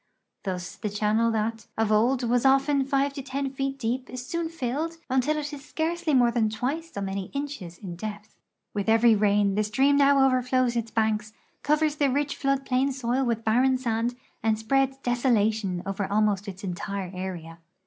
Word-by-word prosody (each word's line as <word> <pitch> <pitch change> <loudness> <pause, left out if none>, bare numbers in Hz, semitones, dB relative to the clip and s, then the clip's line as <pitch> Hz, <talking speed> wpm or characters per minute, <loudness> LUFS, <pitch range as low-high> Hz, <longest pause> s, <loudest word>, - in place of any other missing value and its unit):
Thus 180 -2 -4
the 210 - -3
channel 215 +3 +1
that 225 0 -2
of 220 -1 +1
old 245 +5 +3
was 245 +1 +2
often 275 +1 +4
five 275 0 +1
to 280 - -5
ten 270 +1 -3
feet 270 0 -3
deej) 250 0 -2
is 255 0 -6
soon 335 +3 -2
filled 320 +2 -3
until 265 +4 +2
it 295 0 -4
is 285 -1 -8
scarcely 320 +1 -1
more 240 -2 +5
than 225 -2 +1
twice 280 +10 -3
so 200 - -5
many 195 0 -3
inches 275 -12 -5
in 175 -4 -8
depth. 210 +1 -7 0.4
\\"\{\\ - - -46
every - - +4 0.2
heavy - - +5
rain 205 -1 +3
the 210 +2 +1
stream 270 +7 +3
now 280 -1 +5
overllows 255 -1 +1
its 230 -1 -1
banks, 215 -1 0 0.3
covers 300 0 +1
the 285 -2 +3
rich 285 +2 0
flood 275 -1 0
plain 265 +1 +1
soil 260 0 -1
with 230 -2 -1
l)arren 255 +4 +3
sand, 235 -1 -1 0.3
and 220 0 +1
spreads 270 +4 +1
desolation 220 -7 +1
over 195 0 -3
almost 205 -1 +1
its 190 0 -8
entire 190 0 -4
area. 175 -3 -6
240 Hz, 185 wpm, -26 LUFS, 210-275 Hz, 0.4 s, more